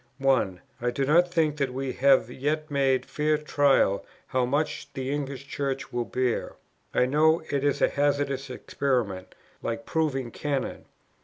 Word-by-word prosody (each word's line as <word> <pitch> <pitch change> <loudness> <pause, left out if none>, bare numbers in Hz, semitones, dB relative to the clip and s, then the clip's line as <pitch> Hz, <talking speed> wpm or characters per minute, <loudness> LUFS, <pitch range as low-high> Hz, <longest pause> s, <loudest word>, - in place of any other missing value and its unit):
"1. 130 -10 +1 0.2
I 120 - +1
do 135 +3 -1
not 175 +5 +4
think 155 -4 +1
that 140 -3 0
we 135 -1 -2
have 135 -3 +4
yet 150 +4 -2
made 135 -2 +2
fair 150 0 +1
trial 140 -9 +2 0.2
how 130 -1 0
much 145 +1 -1
the 135 -1 -3
English 140 -1 -4
Church 140 +1 -3
will 120 -1 -1
bear. 125 -1 -1 0.4
I 125 - +3
know 155 +5 +3
it 140 -1 0
is 145 -1 +1
a - - +7
hazardous 140 -1 0
experiment, 125 -7 -2 0.3
like 115 +5 -3
proving 135 -6 -1
cannon. 140 0 -3
140 Hz, 155 wpm, -27 LUFS, 130-145 Hz, 0.4 s, a